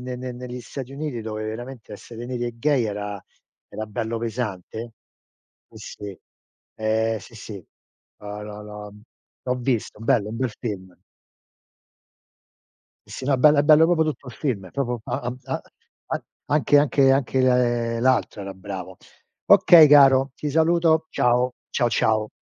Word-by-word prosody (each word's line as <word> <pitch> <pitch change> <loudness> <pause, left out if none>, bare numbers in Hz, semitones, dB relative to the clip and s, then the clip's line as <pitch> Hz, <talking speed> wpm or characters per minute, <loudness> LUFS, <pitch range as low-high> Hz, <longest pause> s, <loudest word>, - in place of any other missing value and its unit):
ne 125 0 -5
ne 125 0 -6
negli 125 0 -7
Stati 130 +2 -8
Uniti, 140 -4 -4
dove 110 -1 -5
veramente 115 +1 -7
essere 115 +3 -9
neri 125 -1 -3
e 120 - -5
gay 140 -1 +2
era 105 -1 -4 0.5
era 110 - -6
bello 110 +2 -3
pesante. 115 -1 -5 0.8
Sì, - - -15 0.3
sì. 100 -4 -8 0.6
Ehm, 110 +1 0
sì, 115 - -15
sì. 100 -4 -9 0.5
L'ho 105 0 -7
l'ho 105 0 -8
l'ho 105 0 -9
mhmm, 105 - -16 0.4
l'ho 125 - 0
visto, 120 -4 -2
bello, 110 -2 +1
un 115 - -6
bel 130 0 -1
film. 95 -5 -6 2.1
Sì, - - -18
sì, - - -6
no 135 +1 +2
è - - +2
bello 150 +3 +5
è - - +5
bello 155 +2 +6
proprio 165 -2 +3
tutto 150 -3 -4
il 125 - -8
film, 110 -11 -3
proprio 125 -4 -2
a 120 -1 -2
a 120 0 -4
a 135 - -4 0.4
an - - -3 0.2
anche 145 -1 +3
anche 140 -1 +4
anche 135 -1 +1 0.6
l'altro 125 -4 +1
era 100 0 -7
bravo. 95 -1 -8 0.5
Okay 165 -3 +8
caro 135 -2 +6
ti 150 - -4
saluto 160 0 +3
ciao, 125 +1 +2 0.2
ciao, 120 -3 +1
ciao. 110 -1 +1
120 Hz, 160 wpm, -23 LUFS, 110-135 Hz, 2.1 s, Okay